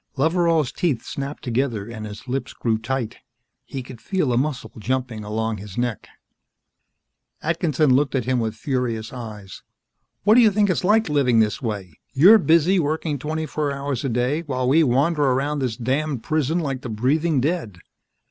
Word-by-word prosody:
Loveral's 160 -2 +2
teeth 160 -10 -1
snapped 140 +1 -5
together 120 -4 -1
and 110 -2 -7
his 105 +4 -10
lips 125 -1 -3
grew 110 -2 -1
tight. 120 0 -3 0.5
He 135 -2 -6
could 125 -3 -11
feel 155 - 0
a - - +2
muscle 135 +2 -1
jumping 120 -1 -2
along 110 +1 -2
his 100 -1 -10
neck. 120 -4 -2 1.4
Atkinson 155 -4 +2
looked 135 +2 +2
at 125 - 0
him 130 0 +1
with 110 -1 -2
furious 125 -6 -2
eyes. 105 -6 -8 0.6
"What 210 +3 +5
do 245 - +7
you 225 - +6
think 205 -1 +2
it's 185 - -1
like, 215 +4 +3
living 140 -6 +2
this 110 +5 +1
way? 100 - -5
You're 195 +11 +8
busy 170 +2 +4
working 155 -1 -1
twenty 155 +3 -3
four 150 -1 -2
hours 140 -2 -3
a 135 - -1
day, 125 +6 0
while 130 -5 -2
we 150 +6 +5
wander 145 +3 +2
around 140 +2 +1
this 125 -4 -2
damned 130 +1 -1
prison 155 0 0
like 135 -6 -2
the 125 - -6
breathing 140 +8 +1
dead. 140 - -2
135 Hz, 175 wpm, -22 LUFS, 115-155 Hz, 1.4 s, You're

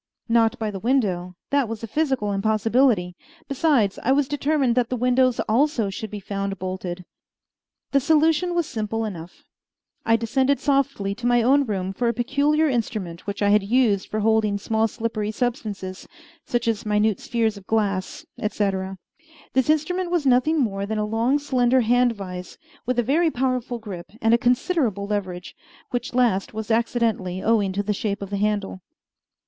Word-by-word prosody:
Not 230 -2 +3
by 215 -2 -2
the 195 - -6
window; 185 -7 0 0.2
that 280 -5 +2
was 225 -1 -6
a - - -3
physical 265 -5 0
impossibility. 215 -1 +2 0.3
Besides, 275 -8 +1
I 260 - +1
was 275 0 +3
determined 290 -3 +1
that 245 -1 +1
the 255 - -1
windows 250 0 +2
also 235 -3 +1
should 215 +3 -6
be 210 - -6
found 195 0 -4
bolted. 185 -1 -5 0.9
The 275 - +4
solution 320 +4 +2
was 345 -2 +1
simple 225 -3 -3
enough. 175 -5 -8 0.6
I 225 - +3
descended 260 +5 +1
softly 275 -8 0
to 240 +4 -3
my 240 -1 +3
own 275 +4 +4
room 190 -2 -2
for 240 +5 -1
a 235 - 0
peculiar 285 +6 +2
instrument 210 - -3
which 200 +1 -3
I 205 - +3
had 210 +1 +5
used 210 -1 +1
for 215 - -2
holding 215 -1 +2
small 220 +2 0
slippery 220 -1 -3
substances, 215 -5 -4 0.4
such 240 -1 -1
as 225 -2 0
minute 210 -1 +1
spheres 230 -3 0
of 200 -2 -13
glass, 200 -4 -1
etc. 195 -3 -2 0.6
This 260 +2 +2
instrument 350 +4 +1
was 345 -4 0
nothing 265 +5 +3
more 200 -6 -1
than 220 +1 -2
a 210 - 0
long, 230 +6 +1
slender 260 -3 +2
hand 245 +1 +3
vise, 180 -3 -8 0.3
with 250 -1 0
a 240 - +3
very 320 +8 +2
powerful 255 -3 -1
grip 195 -6 -8
and 225 +1 +3
a 235 - +4
considerable 245 - +1
leverage, 190 -4 -4 0.4
which 245 0 -3
last 225 -5 +1
was 220 +1 -4
accidentally 225 -5 0
owing 215 -4 +2
to 200 +2 -1
the 210 +1 0
shape 200 0 -3
of 200 - -8
the 200 - -1
handle. 205 -2 -1
225 Hz, 170 wpm, -23 LUFS, 200-255 Hz, 0.9 s, had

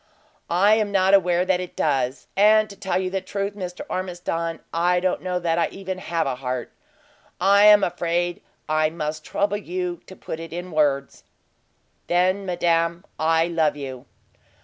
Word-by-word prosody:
"I 195 +5 +4
am 210 -2 0
not 190 -1 +3
aware 180 -2 +4
that 185 -1 +2
it 180 -1 -7
does! 135 -3 0
And 215 +2 +5
to - - -10
tell 190 -1 -1
you 185 -1 -2
the 190 0 -1
truth, 200 +2 -3
Mr. 180 -3 -6
Ormiston, 175 -3 -3
I 175 +2 +2
don't 185 0 -1
know 180 -1 -2
that 170 -1 0
I - - +2
even 190 -1 -6
have 170 -2 -1
a 135 - -1
heart! 125 -1 -4 0.7
I 200 +2 +6
am 210 -1 +7
afraid 175 0 -1 0.3
I 155 0 +2
must 155 -1 -4
trouble 205 +4 -1
you 180 -3 -4
to 190 - -11
put 160 - -7
it 165 0 -8
in 175 +1 -6
words." 145 -3 0 0.8
"Then, 185 +3 +1
madame, 170 0 0
I 160 +1 +3
love 160 -3 +1
you!" 130 -2 -7
175 Hz, 170 wpm, -23 LUFS, 165-190 Hz, 0.8 s, am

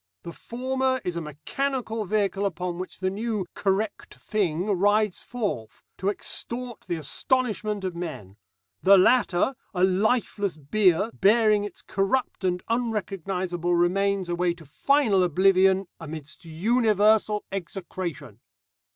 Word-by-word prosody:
The 170 - -7
former 260 +4 -1
is 180 - -2
a 170 - -2
mechanical 225 - -3
vehicle 200 0 0
upon 180 -1 -4
which 185 0 -7
the 185 0 0
new 210 -1 -2
'correct 200 +2 -2
thing' 180 -5 -1
rides 205 0 +2
forth, 200 - -4 0.2
to 190 - 0
extort 240 +3 -4
the 175 - -1
astonishment 210 - -1
of 185 -2 -3
men; 130 - -7 0.4
the 195 +1 +7
latter 195 +2 +3 0.2
a 180 - +1
lifeless 200 -1 +1
bier 185 +6 +2
bearing 210 0 +4
its 205 - -8
corrupt 200 +4 -1
and 180 -1 0
unrecognisable 190 -6 -1
remains 190 +2 +1
away 175 0 0
to 165 -2 -15
final 215 - +2
oblivion, 190 +2 +4
amidst 155 -1 -8
universal 210 +3 +2
execration. 175 - -5
195 Hz, 120 wpm, -26 LUFS, 175-215 Hz, 0.4 s, the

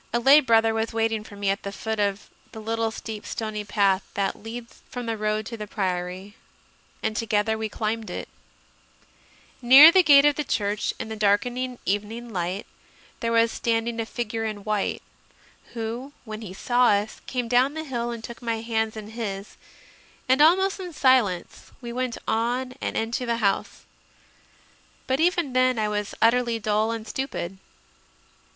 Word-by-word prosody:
A 235 - +1
lay 275 +5 +7
brother 225 -5 +3
was 225 +1 -2
waiting 225 -1 0
for 205 - -12
me 200 -1 0
at 200 - -3
the 200 - -5
foot 220 +2 -4
of 200 -1 -1 0.3
the 220 - -8
little 225 +1 -1
steep 220 -1 -7
stony 215 -2 -4
path 200 -2 +2
that 200 -1 0
leads 230 +2 -9
from 245 -1 -5
the 225 -1 -2
road 215 0 -1
to 230 +1 -6
the 210 -1 -6
Priory, 185 0 -3 0.7
and 220 0 -1
together 215 0 +1
we 220 0 -3
climbed 220 +1 -3
it. - - -5 1.3
Near 270 +6 +10
the 375 - +6
gate 285 -4 +7
of 295 -1 +3
the 300 - 0
church, 205 -5 -1
in - - -5
the 220 - -4
darkening 245 +5 0
evening 220 +4 -3
light, 180 +2 -2 0.5
there 230 -1 -1
was 230 0 +3
standing 230 0 -1
a 225 - -2
figure 225 -2 -3
in 215 -2 -4
white, 210 -1 -1 0.7
who, 235 +5 -5
when 215 -1 -7
he 210 -5 -7
saw 245 +6 +2
us, 205 +1 +1
came 250 -2 -2
down 250 +5 +3
the 315 - -3
hill 240 -5 -3
and 235 -2 -6
took 235 0 -9
my 230 -2 -2
hands 220 -1 -1
in 215 -1 -8
his; 205 -3 -5 0.7
and, 260 +3 +4
almost 380 +5 +4
in 360 -3 -7
silence, 250 - +1
we 240 -2 -7
went 255 -1 -2
on 245 +3 0
and - - -2
into 230 +2 -2
the 235 0 0
house. 200 -4 -1 1.2
But 260 +1 0
even 340 -5 +1
then 255 -1 +3
I 215 -1 +1
was 210 -1 -3
utterly 235 0 +3
dull 215 0 0
and 225 -1 -4
stupid. 205 -7 -4
225 Hz, 170 wpm, -25 LUFS, 210-245 Hz, 1.3 s, Near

